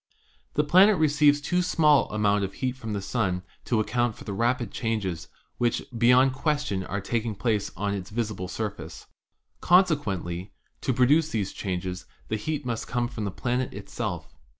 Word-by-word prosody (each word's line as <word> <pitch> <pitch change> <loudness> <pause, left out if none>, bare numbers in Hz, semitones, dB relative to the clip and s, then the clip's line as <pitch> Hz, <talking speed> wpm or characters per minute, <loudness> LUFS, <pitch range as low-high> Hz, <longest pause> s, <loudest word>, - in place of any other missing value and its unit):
The 150 - +3
planet 190 +7 +6
receives 150 -1 +4
too 180 +5 0
small 150 -6 +3
an - - -6
amount 105 -1 +2
of 95 0 -3
heat 130 -1 -2
from 115 -4 -6
the 100 -1 -3
Sun 95 -4 -1 0.2
to 115 - +1
account 120 +1 0
for - - -12
the 100 - -5
rapid 120 +4 0
changes 100 -8 -2 0.3
which 120 -1 +1
beyond 125 +3 +5
question 135 - -1
are 100 +2 -3
taking 110 +2 -2
place 105 -1 0
on 100 0 -1
its 95 -3 -5
visible 105 -4 -3
surface. 90 -6 -6 0.6
Conse 180 -2 +5
quently, 95 - -4 0.3
to - - 0
produce 145 +6 +3
these 105 -8 -2
changes 90 -1 -4 0.2
the 110 - 0
heat 145 +6 -3
must 115 -2 -3
come 120 -1 0
from 110 -3 -5
the - - -1
planet 125 +5 -2
itself. - - -5
115 Hz, 175 wpm, -26 LUFS, 100-135 Hz, 0.6 s, planet